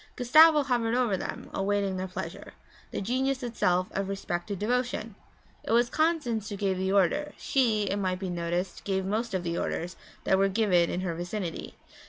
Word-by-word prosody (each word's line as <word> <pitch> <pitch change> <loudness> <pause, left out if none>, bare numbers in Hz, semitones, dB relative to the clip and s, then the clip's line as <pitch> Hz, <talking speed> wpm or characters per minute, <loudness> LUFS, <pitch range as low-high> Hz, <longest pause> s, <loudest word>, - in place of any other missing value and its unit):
Gustavo 305 +5 +6
hovered 240 -3 0
over 245 -5 +2
them, - - -6
awaiting 200 0 0
their 185 +1 -3
pleasure, 185 - -7 0.4
the - - -4
genius 260 +5 -1
itself 185 -6 +1
of 195 0 -2
respectful 195 -1 -3
devotion. 230 +1 -1 0.5
It - - -1
was 240 +1 +3
Constance 300 -10 0
who 205 - -4
gave 195 -2 -1
the 190 0 0
order 200 - +2
she, 230 -6 +1
it 200 0 -1
might 185 -2 -1
be 185 -1 -4
noticed, 175 +2 -3
gave 190 -1 -1
most 215 +2 -1
of 185 - -1
the 170 0 -2
orders 175 +2 -3 0.3
that 190 - +3
were 195 0 +3
given 185 -5 +3
in 180 - -2
her 180 -2 -2
vicinity. 175 +1 -5
200 Hz, 180 wpm, -28 LUFS, 185-240 Hz, 0.5 s, Gustavo